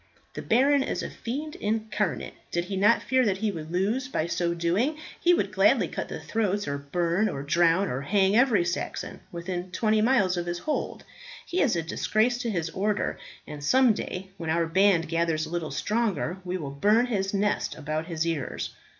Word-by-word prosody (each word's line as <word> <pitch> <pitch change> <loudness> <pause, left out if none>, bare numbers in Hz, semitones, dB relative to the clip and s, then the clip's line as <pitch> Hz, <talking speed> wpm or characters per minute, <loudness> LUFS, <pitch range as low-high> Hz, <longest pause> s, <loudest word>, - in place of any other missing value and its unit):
The - - -5
baron 275 +4 +3
is - - -2
a - - -5
fiend 295 +6 -5
incarnate; 215 -3 -2 0.2
did 175 0 -1
he 195 +2 -4
not 205 +5 +4
fear 260 0 +2
that 200 -5 +1
he 215 +1 0
would 160 -3 -7
lose 210 +9 0
by 160 - -1
so 170 0 -1
doing, 190 - 0 0.2
he 350 - +4
would 350 - +2
gladly - - +4
cut - - -4
the - - -5
throats, 205 -2 -1
or 140 0 -2
burn, 170 +8 0
or 135 - -4
drown, 170 +5 +3
or 130 +2 -3
hang 195 +6 +2
every 230 -7 +4
Saxon 175 +1 -4
within 175 +1 -4
twenty 215 +3 +1
miles 215 -6 +3
of 175 0 -3
his 175 0 -2
hold. 300 +11 -3 0.4
He 360 - -1
is 255 -9 +3
a 165 - -1
disgrace 220 +8 +1
to 240 - -2
his 165 -6 -2
order, 205 +4 -1 0.3
and 150 -1 -8
some 255 - +5
day 190 -1 -6
when 165 -3 -5
our 165 +1 +2
band 185 0 +3
gathers 165 -1 0
a 155 - -10
little 170 -3 -2
stronger, 205 -6 -1
we 180 0 -3
will 145 -6 -5
burn 210 - +3
his 195 -5 -1
nest 205 +1 0
about 155 +2 -3
his 165 -2 -2
ears." 160 -6 -3
190 Hz, 195 wpm, -27 LUFS, 170-220 Hz, 0.4 s, some